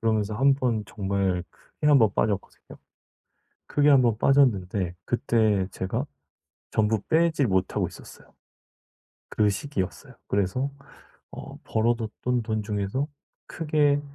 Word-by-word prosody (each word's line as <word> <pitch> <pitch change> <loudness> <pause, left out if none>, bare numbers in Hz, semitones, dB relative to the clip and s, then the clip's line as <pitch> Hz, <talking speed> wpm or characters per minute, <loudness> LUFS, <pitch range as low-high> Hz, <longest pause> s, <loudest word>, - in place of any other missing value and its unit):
그러면서 110 -2 0
한번 130 -4 +2
정말 95 -3 -1
크게 150 - -7
한 145 -2 +7
번 110 -4 +4
빠졌거든요. 100 -2 -3 0.9
크게 145 0 +2
한 135 -3 +6
번 115 -3 +2
빠졌는데 100 -10 +2
그때 110 -6 +1
제가 110 +10 -3 0.7
전부 110 -1 +1
빼지 160 -3 +2
못하고 95 -3 0
있었어요. - - -14 1.0
그 105 -1 +2
시기였어요. 100 -2 -4
그래서 100 +8 0 0.6
어 - - -9
벌어 115 +2 +1
뒀던 120 +2 -2
돈 110 -1 -2
중에서 105 +6 -2 0.4
크게 150 -3 +1
110 Hz, 255 characters per minute, -26 LUFS, 100-135 Hz, 1.0 s, 한